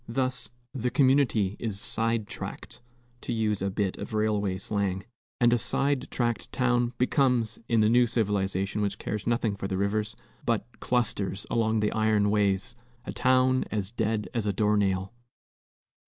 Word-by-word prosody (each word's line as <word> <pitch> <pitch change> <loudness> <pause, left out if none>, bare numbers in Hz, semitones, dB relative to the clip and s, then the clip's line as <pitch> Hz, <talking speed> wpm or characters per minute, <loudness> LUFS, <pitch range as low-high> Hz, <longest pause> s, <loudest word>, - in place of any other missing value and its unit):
Thus 130 +1 -1 0.2
the 125 -2 -1
community 130 -8 +3
is 105 -4 -3
"side 115 0 0
tracked," - - -7 0.4
to - - -4
use 110 -3 0
a 100 - 0
bit 95 -1 -2
of - - -5
railway 105 -3 +1
slang; 100 -1 -2 0.3
and 120 0 +5
a 120 - +3
side 135 +2 0
tracked 120 -2 -1
town 120 -1 +1
becomes 125 -3 +2
in 115 -2 +4
the 105 - +4
new 120 +1 +5
civilization 100 -3 0
which 100 -1 -1
cares 105 0 -4
nothing 115 -3 +1
for 95 - -4
the 95 -1 -2
rivers, 105 +2 -1 0.3
but 115 -3 0
clusters 105 -5 -1
along 110 -1 +2
the 105 - +1
iron 110 -2 +2
ways 100 +1 +1 0.3
a - - -5
town 130 0 +3
"as 105 -2 -3
dead 110 -2 -1
as 115 -3 -1
a 100 - +1
door 105 +1 +2
nail." 95 0 0
110 Hz, 160 wpm, -28 LUFS, 100-120 Hz, 0.4 s, and